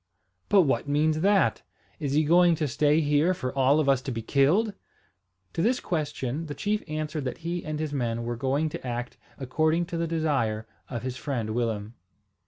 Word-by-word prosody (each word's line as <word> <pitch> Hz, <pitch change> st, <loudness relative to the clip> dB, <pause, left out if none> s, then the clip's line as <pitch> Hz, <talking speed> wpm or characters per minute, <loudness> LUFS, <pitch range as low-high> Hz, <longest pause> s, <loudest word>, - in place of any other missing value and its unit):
"But 200 Hz, -, +6 dB
what 140 Hz, -1 st, 0 dB
means 155 Hz, +2 st, +2 dB
that? 200 Hz, +1 st, +3 dB, 0.4 s
Is 145 Hz, -4 st, -2 dB
he 155 Hz, +2 st, +4 dB
going 170 Hz, +2 st, +5 dB
to 155 Hz, -1 st, -1 dB
stay 150 Hz, +4 st, +2 dB
here 150 Hz, +4 st, +2 dB
for 130 Hz, -7 st, -4 dB
all 135 Hz, +2 st, +4 dB
of 150 Hz, -, +1 dB
us 135 Hz, -2 st, +3 dB
to 130 Hz, -, -4 dB
be 115 Hz, -2 st, -4 dB
killed?" 160 Hz, -, +3 dB, 0.8 s
To -, -, -1 dB
this 240 Hz, +7 st, +2 dB
question 150 Hz, -2 st, -3 dB
the 145 Hz, -, -5 dB
chief 210 Hz, +1 st, -1 dB
answered 155 Hz, -1 st, -3 dB
that 125 Hz, -, -3 dB
he 175 Hz, 0 st, -2 dB
and 155 Hz, -1 st, -4 dB
his 155 Hz, -2 st, -3 dB
men 115 Hz, -4 st, -1 dB
were 120 Hz, 0 st, -3 dB
going 135 Hz, +5 st, 0 dB
to 160 Hz, -4 st, -7 dB
act 120 Hz, +1 st, -4 dB, 0.2 s
according 155 Hz, +6 st, +1 dB
to -, -, 0 dB
the 165 Hz, 0 st, -1 dB
desire 140 Hz, -10 st, 0 dB, 0.2 s
of 120 Hz, -2 st, -4 dB
his 130 Hz, -1 st, -4 dB
friend 120 Hz, -7 st, -3 dB
Willem. 110 Hz, -2 st, -2 dB
150 Hz, 190 wpm, -27 LUFS, 130-160 Hz, 0.8 s, But